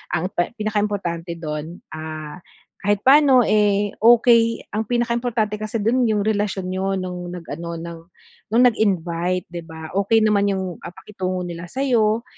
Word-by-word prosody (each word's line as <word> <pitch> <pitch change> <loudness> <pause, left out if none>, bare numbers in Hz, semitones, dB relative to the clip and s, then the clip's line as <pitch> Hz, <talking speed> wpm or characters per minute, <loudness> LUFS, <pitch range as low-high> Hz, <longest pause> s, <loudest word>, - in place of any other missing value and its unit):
Ang 180 +4 -2
pe 175 +6 -2
pinakaimportante 205 -6 -2
dun, 155 +1 -6
ah, 155 +1 -7 0.4
kahit 205 0 0
paano 270 -2 +6
eh, 205 -1 +2
okey, 230 0 +4
ang 215 +1 -2
pinakaimportante 235 -3 -1
kasi 215 0 -3
dun 245 +2 +2
yung 210 -2 +1
relasyon 205 -2 -1
niyo 195 +1 -1
nung 180 -1 -5
nag-ano 170 -1 -6
ng, 165 0 -7 0.5
nung 230 +4 +3
nag-invite 180 -6 +1
'di 170 -1 -6
ba. 160 -1 -9
Okey 220 +2 +3
naman 205 -1 +3
yung 185 -2 -4
ah, - - -9
pakitungo 185 -2 -4
nila 170 0 -7
sayo 235 -2 +1
200 Hz, 145 wpm, -21 LUFS, 175-220 Hz, 0.5 s, paano